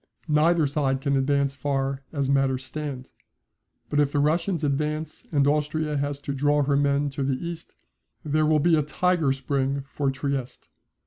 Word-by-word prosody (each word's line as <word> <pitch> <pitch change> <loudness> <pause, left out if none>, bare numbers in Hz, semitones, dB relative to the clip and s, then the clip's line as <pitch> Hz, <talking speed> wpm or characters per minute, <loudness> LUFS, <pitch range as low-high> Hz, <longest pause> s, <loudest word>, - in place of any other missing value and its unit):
Neither 155 +1 +3
side 140 -2 0
can 140 0 0
advance 140 0 +1
far 135 0 -2
as 140 -3 -1
matters 135 -1 +1
stand. 140 -3 -5 0.8
But 145 - 0
if 145 -1 +3
the 145 - -1
Russians 165 +3 +1
advance 150 +2 -2
and 140 -3 +3
Austria 150 +1 0
has 145 0 -1
to 140 - -4
draw 145 +2 +2
her 140 0 +1
men 140 0 +1
to 140 +1 -5
the 135 0 +1
East, 170 +2 -7 0.5
there 155 +1 +2
will 155 0 +4
be 165 +3 +4
a 155 - +3
tiger 160 0 +1
spring 135 0 -1
for 140 0 -1
Trieste. 135 -1 -4
145 Hz, 170 wpm, -25 LUFS, 135-150 Hz, 0.8 s, will